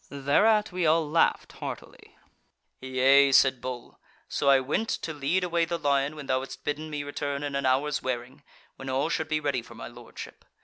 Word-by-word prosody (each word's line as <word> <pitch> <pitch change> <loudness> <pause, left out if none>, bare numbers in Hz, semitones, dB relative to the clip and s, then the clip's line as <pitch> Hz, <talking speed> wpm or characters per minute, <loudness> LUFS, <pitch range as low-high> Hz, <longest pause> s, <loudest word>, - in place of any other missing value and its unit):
Thereat 205 +11 +2
we 180 -2 0
all 160 0 +3
laughed 165 +2 +1
heartily." - - -9 0.6
"Yea," 135 +2 +4
said 130 -2 +5
Bull, 125 -1 -7 0.3
"So 140 - 0
I 135 -1 +6
went 150 +12 -1
to 160 - -3
lead 150 +6 0
away 170 -1 +1
the 170 +1 -2
lion 140 -1 0
when 150 -2 -8
thou 130 -1 +1
hadst 135 - -9
bidden 150 +2 -3
me 150 -1 -4
return 145 0 -4
in 145 -1 -3
an 140 -1 0
hours' 140 +3 +1
wearing, 130 +2 -4 0.4
when 135 0 -7
all 135 +4 0
should 160 -1 -1
be 155 0 0
ready 140 -4 -1
for 120 0 -14
my - - -8
Lordship. 120 0 -11
140 Hz, 190 wpm, -27 LUFS, 130-155 Hz, 0.6 s, I